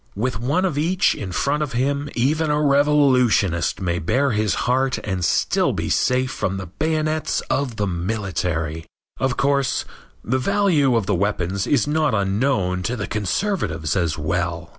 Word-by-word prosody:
With 115 Hz, +2 st, -2 dB
one 145 Hz, +11 st, 0 dB
of 150 Hz, -6 st, -1 dB
each 180 Hz, +5 st, +2 dB
in 95 Hz, -3 st, -6 dB
front 140 Hz, -, 0 dB
of 145 Hz, -2 st, -3 dB
him 140 Hz, +4 st, -1 dB
even 150 Hz, +6 st, +1 dB
a 150 Hz, 0 st, +1 dB
revolutionist 140 Hz, -, +3 dB
may 85 Hz, -2 st, -1 dB
bare 135 Hz, -, +1 dB
his 105 Hz, -3 st, 0 dB
heart 130 Hz, +1 st, +1 dB
and 95 Hz, -3 st, -3 dB
still -, -, +1 dB
be -, -, -3 dB
safe 125 Hz, 0 st, +1 dB
from 95 Hz, 0 st, -2 dB
the 95 Hz, -, -5 dB
bayonets 155 Hz, -, -1 dB
of 135 Hz, -4 st, -1 dB
the 105 Hz, -, -1 dB
military. 85 Hz, -4 st, -3 dB, 0.3 s
Of 130 Hz, -1 st, 0 dB
course, 140 Hz, -1 st, +1 dB, 0.4 s
the 130 Hz, +3 st, 0 dB
value 165 Hz, -6 st, +2 dB
of 115 Hz, -4 st, +1 dB
the 100 Hz, -, 0 dB
weapons 100 Hz, 0 st, -1 dB
is 145 Hz, -, +2 dB
not 150 Hz, -3 st, +1 dB
unknown 100 Hz, -2 st, 0 dB
to 120 Hz, +7 st, -2 dB
the 105 Hz, -4 st, -3 dB
conservatives 105 Hz, -, -1 dB
as 85 Hz, -4 st, 0 dB
well. 85 Hz, +1 st, -2 dB
120 Hz, 160 wpm, -21 LUFS, 95-145 Hz, 0.4 s, revolutionist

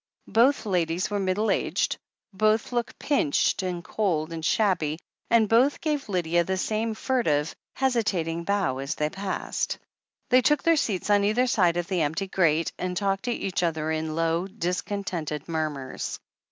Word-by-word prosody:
Both 245 Hz, +3 st, +4 dB
ladies 180 Hz, -1 st, 0 dB
were 205 Hz, -, 0 dB
middle 195 Hz, +3 st, +1 dB
aged, -, -, 0 dB, 0.4 s
both 215 Hz, +4 st, +2 dB
looked 240 Hz, -1 st, -2 dB
pinched 235 Hz, -, +1 dB
and 180 Hz, -2 st, -3 dB
cold 170 Hz, -7 st, -1 dB
and 160 Hz, -1 st, -6 dB
shabby, 170 Hz, -5 st, +1 dB, 0.3 s
and 230 Hz, -2 st, +4 dB
both 245 Hz, +7 st, +3 dB
gave 295 Hz, -6 st, -2 dB
Lydia 175 Hz, -2 st, +1 dB
the 190 Hz, +2 st, -2 dB
same 220 Hz, +3 st, -1 dB
furtive, 165 Hz, -, 0 dB, 0.2 s
hesitating 200 Hz, -11 st, 0 dB
bow 195 Hz, -10 st, 0 dB
as 140 Hz, +3 st, -3 dB
they 150 Hz, 0 st, -1 dB
passed. 195 Hz, 0 st, -3 dB, 0.5 s
Thqr 255 Hz, +1 st, +7 dB
took 295 Hz, +3 st, +2 dB
their 330 Hz, 0 st, +5 dB
seats 210 Hz, -, -1 dB
on 205 Hz, -1 st, +4 dB
either 215 Hz, +5 st, +2 dB
side 180 Hz, -8 st, +2 dB
of 175 Hz, -, -1 dB
the 185 Hz, -3 st, 0 dB
empty 160 Hz, +6 st, 0 dB
grate, 165 Hz, -4 st, +1 dB
an^* 180 Hz, 0 st, -2 dB
talked 195 Hz, +2 st, -1 dB
to 245 Hz, -, 0 dB
each 195 Hz, -6 st, -2 dB
other 160 Hz, -2 st, 0 dB
in 155 Hz, 0 st, -2 dB
low, 165 Hz, +2 st, 0 dB
discontented 180 Hz, -5 st, -3 dB
murmurs. 155 Hz, -5 st, -3 dB
185 Hz, 160 wpm, -26 LUFS, 165-220 Hz, 0.5 s, Thqr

